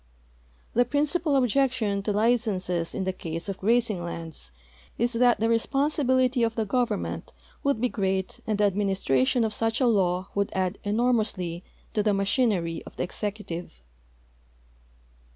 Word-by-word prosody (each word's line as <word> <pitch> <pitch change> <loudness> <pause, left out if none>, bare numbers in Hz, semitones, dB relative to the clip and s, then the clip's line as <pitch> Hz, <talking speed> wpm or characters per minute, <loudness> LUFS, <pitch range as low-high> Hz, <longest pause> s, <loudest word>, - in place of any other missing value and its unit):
The 245 - +4
principal 295 +4 +1
objection 250 -5 +2
to 210 - -1
licenses 205 -6 0
in 190 - -1
the 190 0 -1
case 165 -1 -5
of 195 -1 -4
grazing 220 -3 +1
lands 165 - -7 0.5
is 240 +2 +1
that 245 +1 +4
the 225 - +2
responsibility 260 +1 +2
of 225 -1 +1
the 225 - 0
government 245 +3 -2 0.3
would 280 -5 +1
l)e - - +5
great 190 -4 -2
and 215 -2 +1
the 210 - +2
administration 195 - +2
of 220 -1 -1
such 225 +2 0
a 260 - +3
law 185 -5 +2
would 200 0 0
add 185 +1 -1
enormously 210 -6 0 0.3
to 210 - +2
the 205 -1 +2
ma 195 - +1
chinery 195 -7 +1
of - - -11
the - - 0
executive. 180 - -5
210 Hz, 150 wpm, -26 LUFS, 190-245 Hz, 0.5 s, l)e